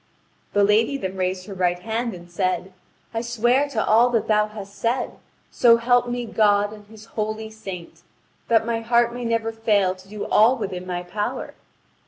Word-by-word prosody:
The 205 - +4
lady 220 +7 +3
then 190 -7 -4
raised 185 0 -2
her 205 - -8
right 180 -2 +1
hand 225 +3 -3
and 175 0 -12
said: 185 +1 -1 0.4
"I 225 - -1
swear 240 +4 +1
to 225 -6 -1
all 230 +3 +5
that 230 -3 0
thou 210 -1 +3
hast 205 -2 -9
said, 235 +4 -2 0.3
so 235 -2 +5
help 245 +1 +2
me 245 0 -2
God 205 -2 +2
and 210 -1 -13
His 215 0 -14
holy 215 0 -3
saint, 180 -6 -9 0.5
that 225 -1 +3
my 230 -1 -1
heart 235 +1 +2
may 245 0 -5
never 230 -1 0
fail 210 -4 +2
to 190 +1 -17
do 210 0 -5
all 235 +5 +4
within 185 -2 -5
my 180 -1 -3
power. 205 +4 -4
215 Hz, 185 wpm, -23 LUFS, 190-230 Hz, 0.5 s, all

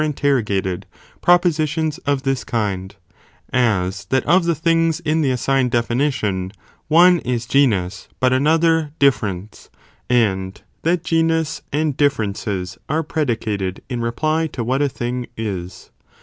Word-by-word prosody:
interrogated, 120 -11 0 0.3
propositions 160 -3 +2
of 140 -1 +1
this 135 -1 -1
kind; 100 -5 -3 0.6
as 100 -6 +1
that 130 0 0
of 180 0 +4
the 170 -1 +1
things 165 +1 +1
in 160 0 +1
the 140 - +2
assigned 130 +1 +1
definition, 115 -6 0 0.4
one 175 +3 +6
is 120 -3 -2
genus, 100 -9 +1
but 130 0 +3
another 160 +3 +3
difference, 105 -7 0 0.4
and 95 -6 0 0.2
that 170 +1 +1
genus 165 -2 0
and 150 -1 0
differences 100 -8 -1
are 160 +3 0
predicated 110 - -2
(in 120 -2 -3
reply) 155 +7 0
to 125 -6 -5
what 130 +4 0
a 145 - +2
thing 125 0 -4
is. 95 -5 -5
130 Hz, 125 wpm, -20 LUFS, 105-155 Hz, 0.6 s, one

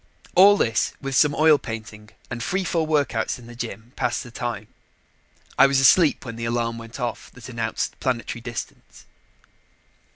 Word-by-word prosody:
All 200 +3 +7
this, 115 - +1
with 135 0 -5
some 145 +2 +4
oil 155 -1 +5
painting 110 -2 -8 0.2
and 120 -1 -4
free 190 +10 -1
fall 165 -3 -1
workouts 145 -7 0
in 125 - -14
the 120 0 -11
gym, 115 0 -7
passed 120 0 -1
the 120 - -12
time. 115 -3 -4 0.9
I - - +8
was 135 -1 +2
asleep 145 +2 +4
when 115 -2 -7
the 115 - -4
alarm 115 0 -1
went 115 +3 -10
off 120 -2 -4
that 125 0 -11
announced 115 -2 -3
planetary 120 -2 -2
distance. 120 -1 -8
120 Hz, 165 wpm, -23 LUFS, 115-140 Hz, 0.9 s, I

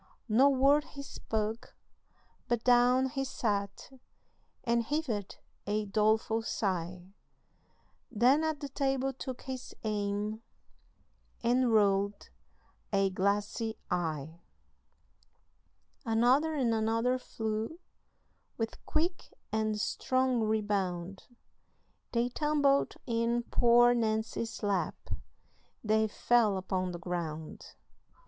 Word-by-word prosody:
No 250 +5 +5
word 280 +2 +4
he 280 - -6
spake, 220 -4 -3 0.8
but 240 -1 0
down 250 +1 +4
he 270 +1 -2
sat, 205 -5 -2 0.7
And 235 0 +2
heaved 230 -6 -2 0.4
a 210 +1 0
doleful 220 +2 +2
sigh, 185 -4 -3 1.0
Then 250 +7 +4
at 315 -2 -1
the 285 - -4
table 270 -1 0
took 260 -1 -7
his 260 -1 -7
aim 210 0 -2 1.0
And 245 +1 +3
rolled 200 -1 +2 0.6
a 195 -1 +2
glassy 205 +4 -1
eye. 160 -1 -2 1.6
Another 255 +7 +3
and 250 -5 +1
another 225 +3 +1
flew, 220 +5 -4 0.8
With 225 -1 -4
quick 345 +4 -1 0.2
and 215 -1 0
strong 255 +3 +1
rebound, 195 -4 -1 0.9
They 235 +1 +1
tumbled 285 0 +2
in 235 0 0
poor 240 0 +5
Nancy's 225 0 -2
lap, 200 -2 0 0.9
They 220 0 +2
fell 220 -2 +2
upon 185 -1 -2
the 175 - -5
ground. 165 -3 -5
225 Hz, 95 wpm, -31 LUFS, 205-255 Hz, 1.6 s, No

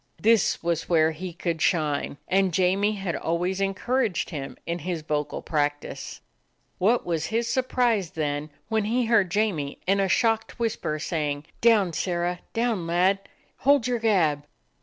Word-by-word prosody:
This 225 -5 +3
was 170 -1 -1
where 160 -2 +4
he 175 +3 -6
could 165 -1 -3
shine, 150 -4 0
and 190 0 +2
Jamie 195 +3 +2
had 195 -4 -3
always 180 +3 -1
encouraged 205 +2 0
him 140 -4 -6
in 170 +1 -2
his 170 -1 -4
vocal 150 -1 -2
practice. 145 -1 -2 0.6
What 225 +6 +2
was 165 -3 -1
his 230 +1 -1
surprise 240 -6 +1
then 150 -1 -3 0.2
when 220 -1 0
he 240 +3 +1
heard 220 -5 +3
Jamie, 180 -8 -1
in 195 +2 +2
a 195 -1 +1
shocked 225 +1 +1
whisper, 225 -9 -1
saying: 150 -2 -2 0.2
"Down, 215 -7 +4
Sirrah! 175 +1 -1
Down, 225 -7 0
lad! 180 +3 +3 0.4
Hold 280 -3 +3
your 245 -1 0
gab!" 160 -10 +2
185 Hz, 150 wpm, -25 LUFS, 160-220 Hz, 0.6 s, where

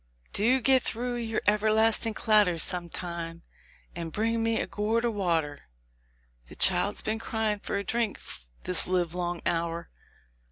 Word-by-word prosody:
"Do 240 +6 +3
get 260 +1 +4
through 245 +2 -1
your 225 -2 -2
everlasting 220 +1 +2
clatter 210 -6 +4
some 175 +2 -1
time, 170 -1 -6 0.5
and 165 -1 -5
bring 225 +5 0
me 225 0 +1
a - - -1
gourd 220 +3 0
of 235 - 0
water; 165 - -1 0.8
the - - -12
child's - - +3
been 220 +1 -1
crying 220 -2 -1
for 200 - -3
a 200 - -2
drink 225 +1 -1 0.4
this 180 - +1
livelong 175 -1 -1
hour." 170 0 -2
210 Hz, 145 wpm, -28 LUFS, 175-225 Hz, 0.8 s, get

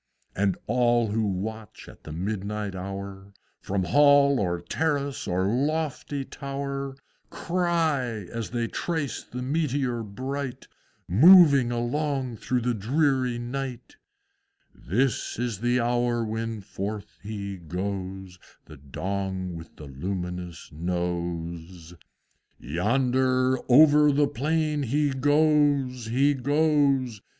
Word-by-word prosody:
And 100 -1 +1
all 120 -2 +2
who 110 +2 0
watch 105 +3 -5
at - - -15
the 75 - -7
midnight 100 +3 -3
hour, 95 +1 -7 0.3
From 95 -1 -1
Hall 140 +4 +5
or 90 -3 0
Terrace 140 - -2
or 90 0 0
lofty 145 +3 -1
Tower, 140 0 -5 0.3
Cry, 160 - -1
as 115 -2 -4
they 120 0 -1
trace 160 +1 -3
the 125 +1 -7
Meteor 135 -4 -1
bright, 130 +5 -5 0.4
Moving 140 - +7
along 130 +1 -2
through 125 +2 -1
the 120 +1 0
dreary 130 +2 +1
night, 125 0 -5 0.8
"This 120 +5 -1
is 120 -4 -2
the 120 +2 +1
hour 120 -1 +1
when 110 0 -3
forth 100 +2 -6
he 100 -2 -5
goes, 95 +1 -5 0.3
The 75 - -13
Dong 95 +5 -4
with 80 0 -11
a 75 - -8
luminous 90 +4 -5
Nose! 85 0 -4 0.7
Yonder, 130 - +1
over 150 +2 +7
the 145 +1 +3
plain 150 +3 0
he 145 +3 +1
goes, 145 -3 +2
He 135 +5 +3
goes! 140 -4 +1
120 Hz, 110 wpm, -26 LUFS, 95-140 Hz, 0.8 s, Moving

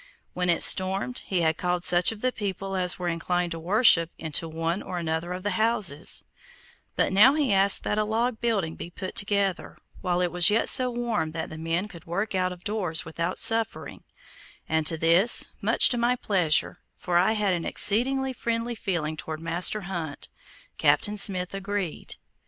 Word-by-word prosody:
When 180 0 -1
it 170 - +3
stormed, 195 +6 +3
he 185 -3 0
had 160 -1 +1
called 180 -1 -2
such 175 +1 +4
of 220 -2 -10
the 255 - +1
people 195 -3 -5
as 180 -1 0
were 180 - -4
inclined 175 +1 -2
to 165 - -4
worship 175 -2 +4
into 160 +1 -3
one 165 +3 -2
or 180 - -6
another 165 +1 -3
of 180 +1 -5
the 205 - -1
houses; 205 -8 +1 0.7
but - - 0
now 240 +9 +6
he 285 -8 +1
asked 195 0 +2
that 210 - -1
a - - +2
log 225 +2 -1
building 200 -9 -1
be - - -8
put 185 +1 -7
together, 200 -2 -1 0.2
while 180 -2 -1
it 180 -1 0
was 175 +2 +6
yet 215 +2 +2
so 255 -1 +4
warm 235 -10 -2
that 165 - -5
the 160 - -8
men 165 +5 -2
could 170 -6 -13
work 195 +6 -3
out 185 -1 0
of 180 -1 -11
doors 200 -7 -2
without 170 +2 -3
suffering, 225 -1 0 0.6
and 160 -1 0
to 165 - -1
this, 170 +8 +4
much - - +4
to 245 - -1
my 240 +1 +2
pleasure, 180 -10 0 0.2
for 175 -1 0
I 190 +5 +2
had 210 -3 0
an 170 -2 -2
exceedingly 265 +5 0
friendly 235 0 -3
feeling 170 -8 -3
toward 155 0 -6
Master 170 +6 0
Hunt, 170 -6 -6 0.5
Captain 150 +8 +2
Smith 185 -3 +1
agreed. 195 -3 -4
185 Hz, 185 wpm, -25 LUFS, 170-215 Hz, 0.7 s, now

